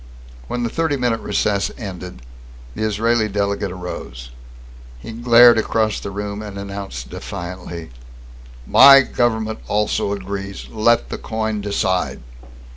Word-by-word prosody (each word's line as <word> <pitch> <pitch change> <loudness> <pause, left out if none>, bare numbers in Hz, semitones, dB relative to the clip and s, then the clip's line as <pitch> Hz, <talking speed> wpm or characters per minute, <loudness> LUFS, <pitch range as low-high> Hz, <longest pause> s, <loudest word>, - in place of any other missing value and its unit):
When 120 - -3
the 120 - -1
thirty 160 -3 0
minute 120 -3 0
recess 100 -2 0
ended, 90 - -8 0.5
the - - -7
Israeli 110 +1 +1
delegate 100 -1 -1
arose. 60 -9 -8 0.7
He - - -9
glared 120 0 +6
across 110 -1 0
the - - -6
room 100 +1 -5
and 105 -2 -8
announced 100 -12 -7
defiantly: 85 -4 -7 0.7
"My 135 - +8
government 110 -4 -1
also 105 +1 0
agrees! 100 0 -5
Let 115 +2 +2
the - - -5
coin 110 -1 -3
decide!" 95 -7 -1
105 Hz, 120 wpm, -20 LUFS, 95-115 Hz, 0.7 s, My